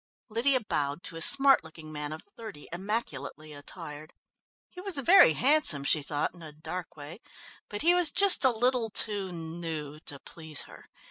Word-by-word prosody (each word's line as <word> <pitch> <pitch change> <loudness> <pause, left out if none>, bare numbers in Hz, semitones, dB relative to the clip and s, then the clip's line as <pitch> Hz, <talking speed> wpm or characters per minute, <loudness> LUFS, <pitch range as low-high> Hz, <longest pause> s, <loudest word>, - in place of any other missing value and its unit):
Lydia 255 +5 +1
bowed 145 -6 -4
to 165 - -6
a 165 - -6
smart 275 +3 +5
looking 160 -1 -13
man 150 -1 -6
of 155 - -8
thirty, 215 -10 -11
immaculately 155 - -5
attired. 150 +1 -10 0.5
He 360 - -12
was 385 -5 -2
very 275 - +5
handsome, 260 - +2
she 150 +2 +2
thought, 145 +1 -3
in 175 - -17
a 155 -2 -10
dark 160 +3 -9
way, 150 +6 -10 0.5
but 205 -1 -1
he 345 +2 +4
was 355 -3 +6
just 390 +1 +5
a 260 - +7
little 245 0 +1
too 200 -2 -1
"new" 160 -3 -7
to 145 -2 -7
please 160 +1 -4
her. - - -16
170 Hz, 175 wpm, -27 LUFS, 150-240 Hz, 0.5 s, a